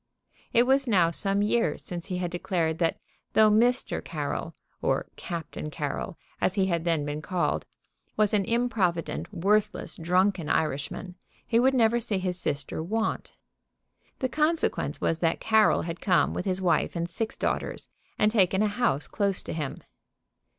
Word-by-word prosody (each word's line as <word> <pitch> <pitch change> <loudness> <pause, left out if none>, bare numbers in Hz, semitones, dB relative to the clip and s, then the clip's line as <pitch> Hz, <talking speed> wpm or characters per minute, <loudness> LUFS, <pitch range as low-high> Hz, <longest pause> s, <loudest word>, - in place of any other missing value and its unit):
It 235 - +5
was 270 +1 +2
now 180 -7 +4
some 200 +4 +1
years 235 +3 +1
since 175 -7 -5
he 180 - -3
had 175 -1 -2
declared 170 -2 -1
that 165 -2 +1 0.4
though 215 -1 +6
Mr. 240 +4 +2
Carroll, - - -4 0.3
or - - +1
Captain 165 -3 -5
Carroll, 150 +4 -4 0.2
as 185 - +2
he 195 -2 +3
had 170 -3 -1
then 165 -4 +1
been 145 +1 -3
called, 175 +3 -1 0.5
was 215 -1 +3
an 205 -2 +3
improvident, 215 -9 0
worthless, 205 +3 0
drunken 180 0 +1
Irishman, 160 +4 -2 0.3
he 230 - +2
would 265 +2 +4
never 235 -1 +4
see 220 -4 -2
his 185 -1 -2
sister 145 +1 -3
want. 220 +7 -2 0.8
The 260 - 0
consequence 305 - 0
was 165 - 0
that 165 -1 +1
Carroll 220 -1 +4
had 165 0 -5
come 185 -3 +3
with 180 - -3
his 190 -1 0
wife 175 0 +2
and 170 0 -1
six 220 +6 -4
daughters - - -2 0.3
and 210 0 +3
taken 195 -2 +3
a - - +3
house 205 - +1
close 200 -3 -1
to - - -5
him. 150 -4 -4
190 Hz, 160 wpm, -27 LUFS, 170-220 Hz, 0.8 s, though